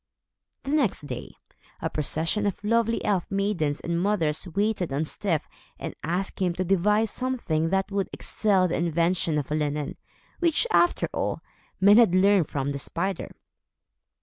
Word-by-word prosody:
The 275 Hz, -, -4 dB
next 275 Hz, -10 st, +2 dB
day, 125 Hz, -4 st, -7 dB, 0.4 s
a -, -, -1 dB
procession 165 Hz, +7 st, -1 dB
of 200 Hz, +1 st, -4 dB
lovely 230 Hz, +1 st, +1 dB
elf 195 Hz, -4 st, 0 dB
maidens 195 Hz, -7 st, 0 dB
and 170 Hz, 0 st, -2 dB
mothers 180 Hz, -5 st, 0 dB
waited 200 Hz, -2 st, -1 dB
on 140 Hz, +3 st, 0 dB
Styf 165 Hz, -1 st, -1 dB, 0.4 s
and -, -, -5 dB
asked 180 Hz, +5 st, -2 dB
him 180 Hz, -2 st, +1 dB
to 185 Hz, -, -2 dB
devise 210 Hz, +4 st, +2 dB
something 235 Hz, -12 st, -1 dB
that 195 Hz, +2 st, 0 dB
would 195 Hz, -1 st, -1 dB
excel 195 Hz, -4 st, +1 dB
the 175 Hz, -, -1 dB
invention 170 Hz, -1 st, +1 dB
of 145 Hz, -1 st, -3 dB
linen; 150 Hz, -1 st, -2 dB, 0.4 s
which, 335 Hz, +4 st, +2 dB
after 350 Hz, -, +3 dB
all, -, -, -2 dB, 0.4 s
men 200 Hz, +2 st, +7 dB
had 225 Hz, -7 st, +5 dB
learned 190 Hz, -3 st, +4 dB
from 140 Hz, 0 st, -2 dB
the 140 Hz, -, -4 dB
spider. 180 Hz, +5 st, -3 dB
185 Hz, 150 wpm, -26 LUFS, 160-205 Hz, 0.4 s, men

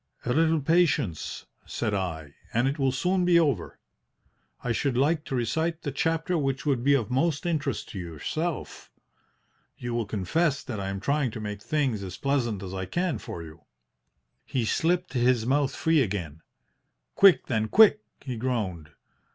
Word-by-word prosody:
"'A 125 Hz, -, +1 dB
little 160 Hz, +2 st, +3 dB
patience,' 155 Hz, -, +1 dB, 0.2 s
said 110 Hz, -, -3 dB
I, 80 Hz, -7 st, -3 dB, 0.2 s
'and 120 Hz, +3 st, +3 dB
it 140 Hz, +3 st, -2 dB
will 135 Hz, -1 st, +2 dB
soon 180 Hz, +7 st, +1 dB
be 175 Hz, -1 st, +5 dB
over. 140 Hz, -, 0 dB, 0.9 s
I 125 Hz, -, -1 dB
should 125 Hz, +1 st, 0 dB
like 150 Hz, +4 st, +2 dB
to 135 Hz, -, -3 dB
recite 160 Hz, +7 st, -1 dB
the 145 Hz, -, -2 dB
chapter 165 Hz, +4 st, 0 dB
which 135 Hz, -2 st, -2 dB
would 135 Hz, -5 st, +1 dB
be 140 Hz, +1 st, +5 dB
of 120 Hz, -5 st, -1 dB
most 155 Hz, +5 st, +1 dB
interest 145 Hz, -8 st, -2 dB
to 95 Hz, -, -6 dB
yourself. 90 Hz, -, -4 dB, 0.9 s
You 120 Hz, -1 st, -4 dB
will 115 Hz, -3 st, -1 dB
confess 140 Hz, -, 0 dB
that 120 Hz, -6 st, -5 dB
I 95 Hz, 0 st, -3 dB
am 95 Hz, 0 st, -4 dB
trying 140 Hz, 0 st, +1 dB
to 110 Hz, -, -7 dB
make 105 Hz, -1 st, -5 dB
things 135 Hz, -6 st, 0 dB
as 95 Hz, -2 st, -6 dB
pleasant 120 Hz, -8 st, -1 dB
as 95 Hz, -1 st, -6 dB
I 95 Hz, -1 st, -3 dB
can 170 Hz, -, -1 dB
for 85 Hz, -, -7 dB
you?" 80 Hz, +1 st, -13 dB, 0.8 s
He 125 Hz, -4 st, -2 dB
slipped 175 Hz, +8 st, 0 dB
his 120 Hz, -2 st, +2 dB
mouth 135 Hz, +2 st, +1 dB
free 160 Hz, -2 st, +3 dB
again. 90 Hz, -, -3 dB, 0.7 s
"'Quick, 195 Hz, -3 st, +6 dB
then, 110 Hz, -3 st, 0 dB
quick!' 215 Hz, -, +6 dB, 0.2 s
he 130 Hz, -4 st, -5 dB
groaned. 105 Hz, -10 st, -2 dB
130 Hz, 165 wpm, -27 LUFS, 105-160 Hz, 0.9 s, Quick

